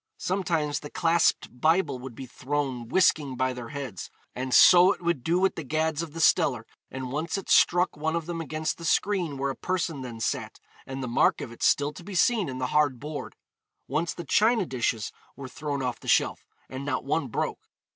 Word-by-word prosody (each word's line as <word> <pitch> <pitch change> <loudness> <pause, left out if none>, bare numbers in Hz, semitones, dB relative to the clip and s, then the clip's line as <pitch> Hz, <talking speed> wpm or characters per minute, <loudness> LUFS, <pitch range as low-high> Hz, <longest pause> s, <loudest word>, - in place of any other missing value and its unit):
Sometimes 170 -6 -1
the 145 - -9
clasped 165 -7 +1
Bible 160 -4 +2
would 125 -2 -9
be 135 - -7
thrown 130 -1 -3
whisking 150 -3 +2
by 130 0 0
their 125 -2 -8
heads; 135 -10 -6 0.2
and 130 +1 -4
'so 180 +7 +8
it - - -14
would 170 -7 0
do 170 +5 +1
with 190 +1 +2
the 165 - -6
gads 155 +2 -1
of 165 -3 -7
the 165 - -6
steller, 140 -8 +3 0.3
and 130 -1 -6
once 155 +7 -2
it 195 - -5
struck 175 +1 +4
one 160 +2 -2
of 165 -2 -2
them 170 -1 -4
against 155 0 -3
the - - -9
screen 175 -5 +1
where 135 0 -1
a - - -7
person 170 -6 -2
then 120 -3 -7
sat, - - -3 0.3
and 135 0 -5
the - - -3
mark 120 - +2
of 115 - -6
it 120 - -14
still 145 +1 +2
to 175 - -11
be 195 +2 -8
seen 205 - +2
in 130 - -5
the 130 -1 -2
hard 145 -5 +2
board.' 150 +2 -6 0.5
Once 155 +5 -1
the 170 - -7
china 220 - +3
dishes 120 -6 -2 0.2
were 140 -1 -8
thrown 140 +1 -4
off 125 -1 -3
the - - -13
shelf, - - +1 0.2
and 130 +1 -7
not 135 -2 -2
one 140 +1 0
broke. 115 - -3
150 Hz, 210 wpm, -27 LUFS, 130-170 Hz, 0.5 s, so